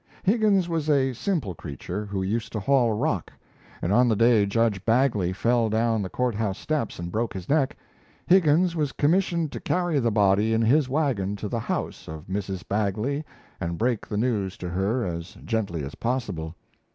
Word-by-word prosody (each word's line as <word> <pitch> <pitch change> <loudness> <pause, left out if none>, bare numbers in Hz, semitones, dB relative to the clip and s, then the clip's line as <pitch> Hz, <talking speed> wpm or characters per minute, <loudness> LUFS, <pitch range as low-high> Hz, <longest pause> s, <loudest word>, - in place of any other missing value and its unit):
Higgins 200 -3 +3
was 160 -3 -2
a 135 -3 +3
simple 135 - -2
creature, 85 +7 -6
who 100 -1 -2
used 110 +4 -2
to 110 - -1
haul 125 +1 +3
rock; 105 - -1 0.5
and 90 - +1
on 125 +3 +5
the 110 - +3
day 115 -2 +4
Judge 105 -2 +1
Bagley 115 -6 +2
fell 115 +4 +1
down 110 0 +1
the 95 - -4
court 125 +2 0
house 105 -2 -2
steps 150 -7 -2
and 85 0 -5
broke 115 0 -2
his 95 -1 -6
neck, 145 -3 +1 0.5
Higgins 175 -1 +4
was 150 -4 -1
commissioned 170 0 +1
to - - -5
carry 175 -5 0
the 120 -3 +2
body 105 +1 +3
in 115 - +2
his 130 +4 +3
wagon 125 -9 0
to 105 +1 -5
the 115 +3 -2
house - - -4
of 80 +1 -8
Mrs. 95 -1 -4
Bagley 110 +8 -1 0.4
and 85 0 -3
break 120 +1 0
the 105 - -3
news 105 -4 -1
to 90 - -5
her 100 +7 0
as 85 0 -5
gently 100 -9 -1
as 70 - -6
possible. 100 -10 -3
115 Hz, 185 wpm, -25 LUFS, 100-135 Hz, 0.5 s, on